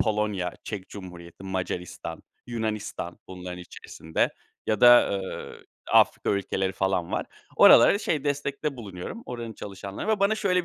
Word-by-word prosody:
Polonya, 105 -4 0
Çek 100 -4 -6
Cumhuriyeti, 90 -3 -10
Macaristan, 90 -2 -4 0.2
Yunanistan 110 -6 -4
bunların 90 -1 -7
içerisinde 80 -2 -3 0.4
ya 110 -2 0
da, 120 0 +8
ııı, 95 -1 -5 0.3
Afrika - - +4
ülkeleri 95 -1 0
falan 95 -3 -1
var. - - -1 0.3
Oralara, 200 +12 +8
şey, 150 -8 -1
destekte 145 0 -2
bulunuyorum, 105 - -7
oranın 120 -2 -5
çalışanlarına 100 - -4
ve 205 - 0
bana 200 +2 +4
şöyle 185 -4 +1
105 Hz, 130 wpm, -26 LUFS, 95-125 Hz, 0.4 s, da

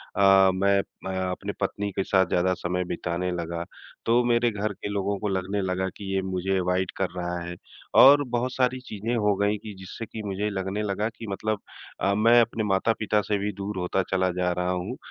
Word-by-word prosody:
अ, 95 -1 +6
मैं 100 +1 +3
अ, 95 - -7 0.2
अपनी 100 +3 -4
पत्नी 100 +1 -1
के 95 - -1
साथ 95 -1 +3
ज़्यादा 90 +2 +2
समय 90 0 -2
बिताने 85 +1 -2
लगा, 85 -1 -3 0.4
तो 120 +2 +4
मेरे 120 0 +3
घर 105 0 -2
के 100 - -7
लोगों 100 0 -1
को 105 - -2
लगने 95 +1 -1
लगा 95 0 -1
कि 100 - -8
ये 95 - +1
मुझे 95 0 -1
अवॉइड 90 0 0
कर 95 - 0
रहा 90 -1 -3
है। 85 +1 -6 0.5
और 145 +2 +8
बहुत 125 +2 -1
सारी 130 0 +1
चीज़े 110 +2 -3
हो 105 -3 +2
गईं 105 +2 +1
कि 105 - -7
जिससे 95 +4 -7
कि 110 0 -7
मुझे 100 +1 -2
लगने 95 +1 -3
लगा 105 +1 -1
कि 115 0 -10
मतलब 105 +2 -2 0.4
अ, 100 +1 +2
मैं 115 +3 +6
अपने 115 -1 -1
माता-पिता 105 +1 +1
से 105 0 -1
भी 100 +1 -2
दूर 100 +1 -5
होता 90 +1 0
चला 95 -1 +2
जा 90 0 0
रहा 90 +1 -1
हूँ। 90 +7 -3
100 Hz, 205 wpm, -26 LUFS, 95-105 Hz, 0.5 s, और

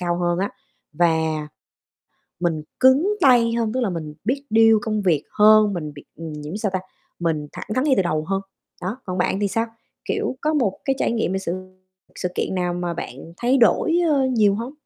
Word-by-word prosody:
cao 175 -1 0
hơn 175 0 0
á, 195 +2 -1 0.4
và 160 -2 +1 0.9
mình 165 -3 0 0.2
cứng 280 +11 +5
tay 240 -4 +5
hơn, 230 -2 0
tức 260 - -1
là 230 -6 0
mình 155 -3 -5
biết 270 +6 -1
deal 225 0 +6
công 215 -3 -1
việc 165 -7 +2 0.2
hơn, 215 0 +6
mình 155 -4 -4
biết 145 - -12
nhiễm 155 +1 -6
sao 210 -2 -1
ta, 185 - 0 0.4
mình 155 -3 -1
thẳng - - -7
thắn 255 +2 +1
ngay 280 - +4
từ - - +3
đầu 155 -3 -1
hơn. 195 0 0 0.4
Đó, 190 +6 -3
còn 185 -1 -4
bạn 190 +2 0
thì 200 - +1
sao? 225 +3 0 0.4
Kiểu, - - -2
có 310 +1 0
một 230 -10 0
cái 270 - +1
trải - - +1
nghiệm 225 -5 0
về 190 - 0
sự 190 -3 -3 0.6
sự 180 - -2
kiện - - -2
nào 180 -1 -1
mà 175 -1 -3
bạn 140 +4 -8
thay 245 +5 +2
đổi, 325 +7 +3
ơ, 275 -4 +3
nhiều 205 -3 +4
hông? 235 +5 -5
195 Hz, 205 wpm, -22 LUFS, 170-235 Hz, 0.9 s, deal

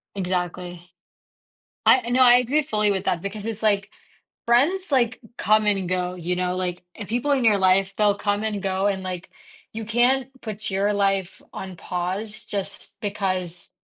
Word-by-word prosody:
Exactly. 180 -1 -3 1.1
I 260 - +6
I - - -3
know, 255 +1 +4
I 245 -1 +8
agree 250 +5 +3
fully 210 -6 +1
with 190 -1 -1
that 170 -2 0
because 205 +2 -5
it's, 220 -1 -3
like, 200 -2 +1 0.6
friends, 290 +9 +3
like, 240 -4 +2 0.2
come 215 +2 +3
and 195 -3 +1
go, 180 0 -1
you 180 0 -3
know, 180 0 -1
like, 180 -1 -3
if 205 -4 -7
people 245 +6 0
in 265 -4 +2
your 210 -3 +5
life, 190 +1 +3
they'll 205 -1 +3
come 205 0 0
and 210 -3 -2
go 190 0 0
and, 195 -2 0
like, 185 -2 -6 0.4
you 225 0 -5
can't 245 +4 +2
put 215 -1 -5
your 200 +2 +1
life 195 -2 0
on 190 -2 -7
pause 190 +6 -4
just 200 -2 -4
because, 185 -4 -3
200 Hz, 175 wpm, -23 LUFS, 185-225 Hz, 1.1 s, I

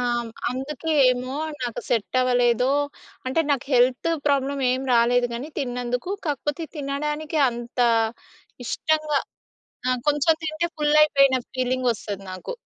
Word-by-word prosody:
హ్మ్, 235 -1 -3 0.2
అందుకే 275 +5 -4 0.2
ఏమో 255 +2 -4 0.3
నాకు 240 -2 -3
సెట్టవలేదో, 245 +1 +2 0.6
అంటే, 265 +6 +1
నాకు 275 -2 0
హెల్తు 255 +6 +3 0.2
ప్రాబ్లమేం 270 -2 +1
రాలేదు 245 +1 +4
గానీ 250 +6 -5
తిన్నందుకు, 250 +4 -3
కాకపోతే 295 +2 -2
తినడానికి 300 +3 -2
అంతా 240 0 0 0.8
ఇష్టంగా 305 +2 0 0.7
ఆ! - - +3 0.2
కొంచెం 295 +2 +3
తింటే 320 +2 -1
ఫుల్లయిపోయిన 295 -3 +5 0.2
ఫీలింగొస్తది 245 -6 -1
నాకు. 185 - -7
260 Hz, 105 wpm, -24 LUFS, 245-295 Hz, 0.8 s, ఫుల్లయిపోయిన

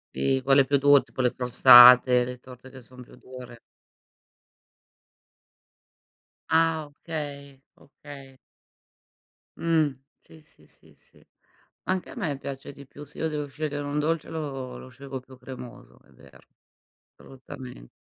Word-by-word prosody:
Si, 130 - 0
quelle 135 0 +4
più 140 +2 +1
dure, 145 0 +5
tipo 130 - -6
le 125 - 0
crostate, 125 0 +7
le 125 0 -7
torte 130 +1 -15
che 130 - -13
son 125 +1 -15
più - - -18
dure. 125 -2 -13 2.9
Ah 160 -1 +1
okay! 145 -3 -9 0.2
Okay. 140 -2 -15 1.2
Mh. 160 -5 0 0.3
Sì, 160 - -18
sì, 155 - -24
sì, - - -21
sì. - - -26 0.6
Anche 185 -1 -3
a - - -12
me 160 - -4
piace 140 0 -8
di 140 0 -14
più. 145 +2 -13
Se 150 - -11
io 160 - -2
devo 150 -1 -4
scegliere 145 +1 -5
un 145 +1 -4
dolce, 160 +1 -2
lo 135 -5 -6
lo 130 - -12
scelgo 135 +1 -9
più 130 0 -17
cremoso, 120 - -12
è - - -26
vero, - - -19 0.8
assolutamente. 130 - -13
135 Hz, 135 wpm, -25 LUFS, 125-150 Hz, 2.9 s, crostate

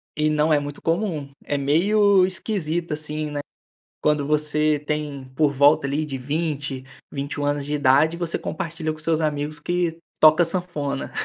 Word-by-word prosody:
E 155 +1 +1
não 155 +1 +2
é 150 - +4
muito 145 0 -7
comum, 165 -5 -1 0.2
é 145 - -1
meio 190 +7 +4
esquisito 175 -4 -2
assim, 150 0 -3
né, 145 - -3 0.6
quando 150 -1 +2
você 150 0 +1
tem 150 -2 -4
por 150 -1 +3
volta 145 +1 +4
ali, 150 +3 -1
de 135 -3 -5
20, 145 -1 -3 0.3
21 145 +1 -3
anos 145 -1 -1
de 150 - -3
idade, 145 +4 +4
você 170 -1 -2
compartilha 165 -1 -4
com 155 - -12
seus 160 0 +1
amigos 150 0 -1
que 175 0 -1 0.2
toca 155 +2 +6
sanfona. 165 -6 -3
150 Hz, 160 wpm, -23 LUFS, 145-165 Hz, 0.6 s, toca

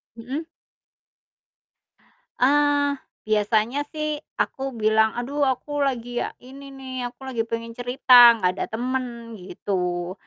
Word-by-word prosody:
Mhm. 265 +8 -6 1.9
Eee, 285 +2 +3 0.3
biasanya 215 +5 +1
sih 305 -1 -3 0.2
aku - - -3 0.2
bilang, 220 +1 +4
"Aduh 275 +5 -3
aku 285 +2 0
lagi 245 -3 -1 0.2
ini 275 +2 -12
nih, 265 -1 -9 0.2
aku 250 +2 -14
lagi 255 -3 -2
pengen 230 0 -4
cerita, 245 +2 +1 0.2
nggak 185 -4 +1
ada - - 0
temen," 240 0 -4
gitu. 180 -1 -3
245 Hz, 110 wpm, -23 LUFS, 225-275 Hz, 1.9 s, bilang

